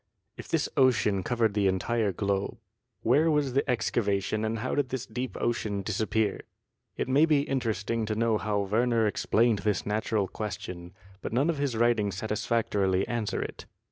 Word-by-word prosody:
If - - -9
this - - 0
ocean 105 -7 +3
covered 115 0 +1
the 100 -1 +2
entire 105 +3 +1
globe, 100 +1 -2 0.5
where 145 +8 +4
was 145 -4 +1
the 140 +1 +1
excavation 110 -3 0
and 110 +1 -1
how 125 +4 -3
did 145 -3 0
this 130 -2 -3
deep 125 +3 -5
ocean 105 -4 -1
disappear? 105 +1 0 0.6
It - - -1
may 140 +5 +4
be 150 -3 +4
interesting 115 -5 -1
to 110 - -1
know 110 -1 +1
how 105 -1 0
Werner 115 +3 +2
explained 110 +1 +2
this 100 -1 -1
natural 105 -1 0
question, 90 -4 -6 0.3
but - - -5
none 140 +8 +3
of 155 - -5
his 140 -5 -1
writings 110 -5 +2
satisfactorily 105 -3 0
answer 115 -4 -2
it. - - -8
110 Hz, 165 wpm, -28 LUFS, 100-120 Hz, 0.6 s, where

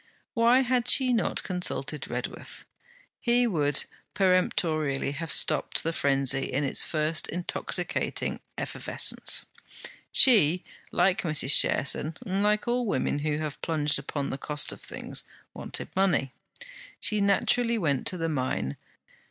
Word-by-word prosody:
Why 235 +2 +4
had 250 -1 0
she 255 -1 +5
not 230 - 0
consulted 180 -2 -2
Redworth? - - -6 0.5
He 240 0 +2
would 150 - 0 0.3
peremptorily 160 -7 +1
have 155 +1 -4
stopped 140 - +1
the 165 - -1
frenzy 135 -2 0
in 140 +3 0
its 135 - +1
first 155 0 -1
intoxicating 175 +1 -2 0.2
effervescence. - - -1 0.7
She, 185 - +5 0.3
like 195 0 +2
Mrs. 150 -4 +4
Cherson, 155 +3 +3
like 210 +3 0
all 245 0 0
women 145 -4 -1
who 150 0 -1
have 155 -2 -5
plunged 150 -3 0
upon 140 0 -4
the 135 - -5
cost 150 0 +1
of - - -10
things, - - -5 0.3
wanted - - -4
money. 175 -9 +1 0.7
She 215 -1 +1
naturally 230 +4 +2
went 145 - 0
to 185 - -1
the 165 -1 -2
mine. 130 - -2
165 Hz, 125 wpm, -27 LUFS, 145-210 Hz, 0.7 s, she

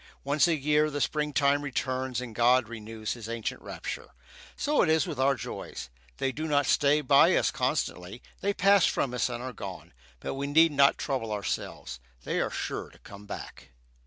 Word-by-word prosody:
Once 140 +2 +3
a 170 - +2
year 150 +1 +2
the 145 -1 -3
springtime 145 -1 +1
returns 130 -2 -2
and 120 -3 -7
"God 120 +1 +4
renews 110 -1 -5
His 115 -2 -8
ancient 115 -1 -4
rapture." - - -7 0.4
So 295 0 +1
it 160 - +2
is 160 +2 +3
with 160 -7 -5
our 135 +1 +3
joys. 60 - -7 0.3
They 135 - 0
do 155 +4 -4
not 145 -2 +2
stay 145 +3 +3
by 140 0 +5
us - - +2
constantly; 90 +7 -2 0.2
they 200 - 0
pass 200 0 +4
from 125 - -1
us 125 0 0
and 120 0 -5
are 130 -1 -5
gone; 95 -5 -8 0.3
but - - -4
we 140 +1 -3
need 160 +3 +5
not 140 -1 +4
trouble 130 -6 -2
ourselves 100 -11 -4 0.2
they - - -1
are - - 0
sure - - -4
to - - -19
come 100 +1 -13
back. - - -8
135 Hz, 190 wpm, -28 LUFS, 115-150 Hz, 0.4 s, by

